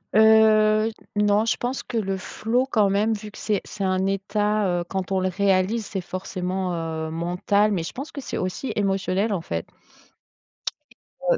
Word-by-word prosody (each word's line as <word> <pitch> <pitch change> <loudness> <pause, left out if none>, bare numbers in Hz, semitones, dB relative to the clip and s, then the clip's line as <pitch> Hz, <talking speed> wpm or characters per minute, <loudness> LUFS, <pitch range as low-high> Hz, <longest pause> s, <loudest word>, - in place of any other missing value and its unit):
Heu, 220 0 +6
j - - -16 0.2
n 210 - +3
non, 205 +1 +4
je 230 - +1
pense 250 +2 -2
que 235 - -4
le 195 -2 -1
flow 240 +7 -1
quand 210 -5 +3
même 210 +3 +2
vu 210 0 -8
que - - -13
c'est 210 -3 0
c'est 200 - -5
un 185 0 +1
état, 205 +1 0
heu, - - -3
quand 190 0 -3
on 190 - +2
le 185 0 +1
réalise 195 +3 +1
c'est 195 - -3
forcément, 185 0 -3
heu, 160 -1 -3
mental 180 +5 +1
mais 180 -4 0
je - - -6
pense 275 +4 -6
que 280 - -6
c'est - - -4
aussi 185 +8 -3
émotionnel 195 +1 0
en 175 - -1
fait. - - -4 1.6
Heu, - - +2
200 Hz, 190 wpm, -24 LUFS, 185-215 Hz, 1.6 s, Heu